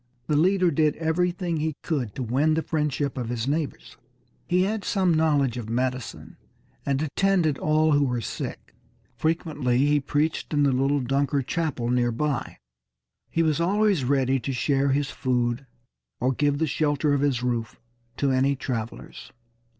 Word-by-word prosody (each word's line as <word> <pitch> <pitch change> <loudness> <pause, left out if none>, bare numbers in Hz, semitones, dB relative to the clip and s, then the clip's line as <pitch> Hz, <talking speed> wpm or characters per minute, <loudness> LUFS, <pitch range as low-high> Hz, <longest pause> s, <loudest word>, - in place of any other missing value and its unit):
The 150 - 0
leader 180 +3 +3
did 150 0 +2
everything 170 +1 -1
he 155 -1 -2
could 130 - -2
to 130 - -3
win 140 +7 +2
the 160 - 0
friendship 145 -3 -1
of 120 -2 -4
his 120 0 -2
neighbors. 150 +1 -3 0.5
He 180 +1 +3
had 205 +1 -1
some 185 -4 +1
knowledge 145 -6 +2
of 115 -3 -6
medicine, 125 0 -3 0.5
and 140 +1 +1
attended 165 -1 +1
all 155 +1 +2
who 145 -1 +4
were 125 -2 -1
sick. - - -6 0.4
Frequently 155 -6 0
he 145 0 +3
preached 150 +2 -1
in 145 - +3
the 140 - +3
little 135 +2 +1
Dunker 140 +2 0
chapel 145 -5 -2
near 120 -1 +2
by. 140 +3 -2 0.7
He 165 - +1
was 155 0 +1
always 200 -2 +2
ready 135 0 +2
to 130 +3 -4
share 135 +2 +1
his 140 +1 0
food 125 0 -1 0.5
or 125 +2 +1
give 145 +2 +1
the 160 - +1
shelter 145 0 +1
of 140 - +1
his 135 -4 +1
roof 120 -2 -2 0.4
to 140 -1 +1
any 135 +2 +2
travelers. 120 -4 -6
145 Hz, 160 wpm, -25 LUFS, 130-160 Hz, 0.7 s, who